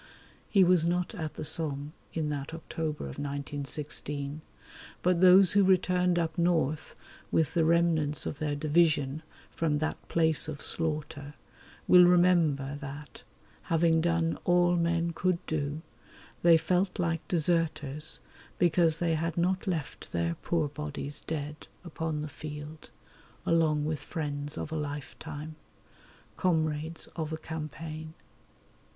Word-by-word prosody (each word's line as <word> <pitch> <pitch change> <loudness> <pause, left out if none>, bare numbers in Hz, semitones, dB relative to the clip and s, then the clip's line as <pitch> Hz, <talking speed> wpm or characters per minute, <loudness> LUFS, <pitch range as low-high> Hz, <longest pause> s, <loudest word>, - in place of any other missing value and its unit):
He 195 -3 +5
was 175 -2 +4
not 175 +1 0
at 160 -3 -5
the - - -5
Somme 150 -2 -2 0.2
in 155 -2 -2
that 145 +2 -4
October 160 -1 -4
of 70 -1 -7
1916, 145 +1 -4 0.6
but 180 -1 +2
those 185 0 +7
who 200 0 +5
returned 180 -1 +3
up 165 -1 -1
north 160 -4 +1 0.3
with 160 -3 +1
the 170 - +3
remnants 160 -3 +2
of 145 - -4
their 150 -1 -1
division 155 -1 +2 0.3
from 155 -3 0
that 155 +1 -3
place 160 -1 +2
of 150 -2 -5
slaughter 150 -3 -2 0.5
will 180 -1 +8
remember 170 -6 +3
that, 145 +1 -8 0.4
having 165 0 +3
done 165 -1 +1
all 175 0 +4
men 170 0 +1
could 180 +1 +1
do, 155 0 -2 0.6
they 170 -1 +7
felt 180 +3 0
like 165 -2 -1
deserters 155 -3 0 0.4
because 170 -2 +3
they 165 -1 +1
had 165 +1 -2
not 185 +3 0
left 165 -7 -4
their 85 0 0
poor 165 -3 0
bodies 145 0 -5
dead 150 -1 -4 0.2
upon 160 -3 -3
the - - -4
field 150 0 -8 0.6
along 155 -3 +2
with 155 -1 -2
friends 145 -1 -4
of 155 - -5
a - - -2
lifetime, 150 +1 -6 0.8
comrades 160 -2 0
of 160 -2 -3
a 160 - -2
campaign. 155 0 -7
160 Hz, 130 wpm, -29 LUFS, 150-170 Hz, 0.8 s, will